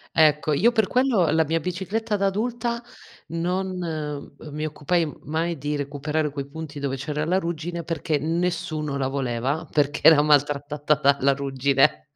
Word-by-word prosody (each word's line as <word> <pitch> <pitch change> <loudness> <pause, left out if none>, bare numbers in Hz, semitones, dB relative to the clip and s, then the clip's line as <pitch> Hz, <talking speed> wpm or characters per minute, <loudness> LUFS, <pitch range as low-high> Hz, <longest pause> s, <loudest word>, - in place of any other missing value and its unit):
Ecco, 150 -1 +4
io 215 +12 +4
per 220 -4 +2
quello 245 - +3
la 160 +1 +3
mia 165 +2 0
bicicletta 195 +5 -2
da 195 - +2
adulta 235 +3 -1 0.5
non 165 -4 -3 0.2
mi 155 +1 -3
occupai 155 +2 0
mai 165 +3 -2
di 145 +2 -3
recuperare 145 +2 -2
quei 140 -1 -5
punti 150 0 -8
dove 140 -1 -2
c'era 150 +3 -3
la 180 +4 +2
ruggine, 170 -1 -3
perché 160 -2 -1
nessuno 165 -2 -1
la 130 -1 0
voleva, 135 +3 -2
perché 145 -1 +1
era 155 -2 +8
maltrattata 145 0 +2
dalla 140 -1 +4
ruggine. 135 0 +1
155 Hz, 150 wpm, -24 LUFS, 145-175 Hz, 0.5 s, era